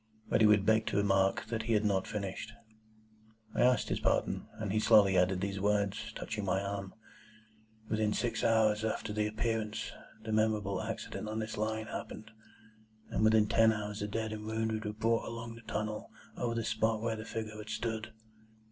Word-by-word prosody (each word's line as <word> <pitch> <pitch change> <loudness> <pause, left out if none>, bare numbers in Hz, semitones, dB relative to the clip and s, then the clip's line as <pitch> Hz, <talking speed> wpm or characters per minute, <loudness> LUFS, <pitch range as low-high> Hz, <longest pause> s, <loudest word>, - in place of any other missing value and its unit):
But - - +3
he 110 - +8
would 105 -2 +5
beg 110 0 +3
to - - 0
remark 95 0 +2
that 115 -1 -1
he 115 +1 0
had 105 0 +2
not 95 -2 +1
finished. 105 +1 -4 1.0
I - - 0
asked 125 0 +4
his - - 0
pardon, - - 0
and 105 -3 -4
he 110 - +3
slowly 100 -3 +6
added 90 0 +3
these 100 0 -2
words, 100 0 0
touching 110 -2 -4
my 95 0 +1
arm,— 100 -1 -4 0.9
"Within 110 -1 +1
six 120 +2 -1
hours 110 -1 +3
after 110 -1 -2
the 105 0 +1
Appearance, 110 0 -2 0.3
the 110 - -4
memorable 105 -3 +1
accident 110 -1 -5
on 110 - -3
this 110 0 -3
Line 110 +1 -1
happened, 110 0 -7 0.8
and - - 0
within 110 -1 +5
ten 115 0 +5
hours 105 -1 -4
the 105 - -2
dead 110 +1 -2
and 105 0 -6
wounded 110 0 -2
were 105 - -2
brought 115 +2 +1
along 115 0 -6
through 115 0 -11
the - - -6
tunnel 105 0 -3 0.3
over 115 -1 -2
the 115 - -1
spot 110 0 +1
where 115 0 -1
the 110 - -6
figure 110 -1 -5
had 105 0 -8
stood." 110 -1 -3
110 Hz, 190 wpm, -32 LUFS, 105-110 Hz, 1.0 s, he